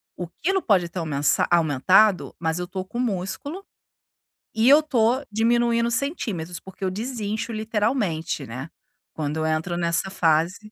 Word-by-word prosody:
O 175 - -5
quilo 385 +4 +1
pode 185 - +2
ter 175 - -10
aumensa 145 -3 +1
aumentado, 175 +5 +4
mas 160 0 -1
eu 180 - -3
tô 185 0 -5
com 235 +5 -6
músculo 250 - -3 0.9
e 225 +3 +3
eu 295 +3 +7
tô 250 -3 +2
diminuindo 235 +2 +2
centímetros, 215 - -3
porque 190 0 -9
eu 185 - 0
desincho 220 +1 -4
literalmente, 210 - -1
né, 130 +7 -6 0.5
quando 150 -1 -3
eu 160 0 -1
entro 160 +2 -1
nessa 170 +2 -1
fase 165 -1 +2
190 Hz, 145 wpm, -24 LUFS, 165-235 Hz, 0.9 s, eu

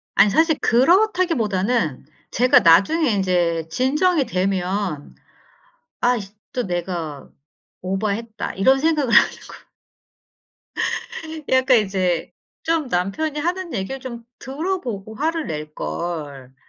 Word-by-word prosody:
아니 200 +1 +6
사실 320 - +3
그렇다기보다는 245 - +2 0.3
제가 255 +4 +5
나중에 220 - +4
인제 175 -4 0
진정이 290 - +1
되면 185 -5 -2 0.9
'아이 245 -2 +2 0.3
또 250 - -1
내가 170 -5 -4 0.5
오바했다.' 210 +4 -3
이런 265 +8 +4
생각을 300 -5 +1
하는 - - +7 0.2
거. - - -14 1.8
약간 260 -1 +4
이제 185 -4 -1 0.3
'좀 325 -4 0
남편이 220 - -1
하는 350 +2 -2
얘기를 220 +6 -4
좀 235 -3 -8 0.2
들어 335 +8 -3
보고 215 -3 -6
화를 320 +4 -1
낼걸.' 150 -3 -5
220 Hz, 225 characters per minute, -21 LUFS, 180-290 Hz, 1.8 s, 하는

